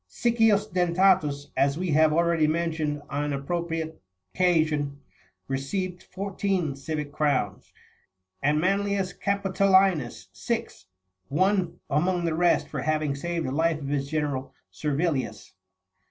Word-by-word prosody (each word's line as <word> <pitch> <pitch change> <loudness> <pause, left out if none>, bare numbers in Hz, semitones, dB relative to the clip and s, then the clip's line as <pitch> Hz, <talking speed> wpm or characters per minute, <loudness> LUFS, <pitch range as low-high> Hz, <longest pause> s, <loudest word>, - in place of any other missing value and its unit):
Siccius 225 - +3
Dentatus, 175 -6 +2
as 140 +1 +2
we 180 -1 -1
have 155 +1 +5
already 165 -1 +3
mentioned36 155 -2 -1
on 145 0 -1
an 145 -1 -2
appropriate 165 +2 -3 0.3
occasion, 155 -5 +1 0.5
received 175 +7 -3
fourteen 190 -5 -2
civic 150 +1 -4
crowns, 140 -10 -1 0.7
and 150 +2 +2
Manlius 195 +1 0
Capitolinus37 190 - +2
six,38 95 0 -4 0.5
one, 190 -1 +1
among 175 +4 +1
the 165 - 0
rest, 175 +2 +2
for - - -4
having 155 -2 0
saved 170 +3 -3
the 130 - -2
life 160 +3 +1
of 140 -2 -5
his 140 -1 -1
general, 145 -3 -2 0.2
Ser 150 -2 -2
vilius. 150 -4 -2
160 Hz, 125 wpm, -26 LUFS, 145-185 Hz, 0.7 s, have